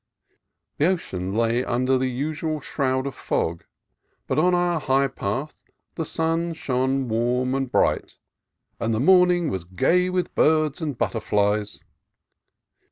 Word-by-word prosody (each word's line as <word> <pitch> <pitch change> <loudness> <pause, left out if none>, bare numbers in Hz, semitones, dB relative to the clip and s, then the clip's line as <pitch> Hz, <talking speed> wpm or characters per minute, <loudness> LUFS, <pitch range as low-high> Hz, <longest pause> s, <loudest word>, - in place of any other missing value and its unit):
The 150 - +3
ocean 95 - -2
lay 115 +2 +1
under 130 +2 +1
the 130 0 +1
usual 155 +4 -3
shroud 130 -2 -1
of 140 - -3
fog, 85 +1 -2 0.6
but 130 - 0
on 180 +3 +3
our 175 -1 +1
high 135 -1 +2
path 135 +4 -4 0.4
the 160 - -3
sun 165 +2 -1
shone 130 -2 -1
warm 120 +3 0
and 135 -2 -2
bright, - - +1 0.6
and 115 -1 0
the - - -1
morning 180 +2 +4
was 95 -3 -3
gay 170 - +1
with 180 -1 -2
birds 155 -1 +2
and 150 -6 -3
but - - 0
terflies. 105 -1 -1
135 Hz, 140 wpm, -24 LUFS, 120-160 Hz, 0.6 s, morning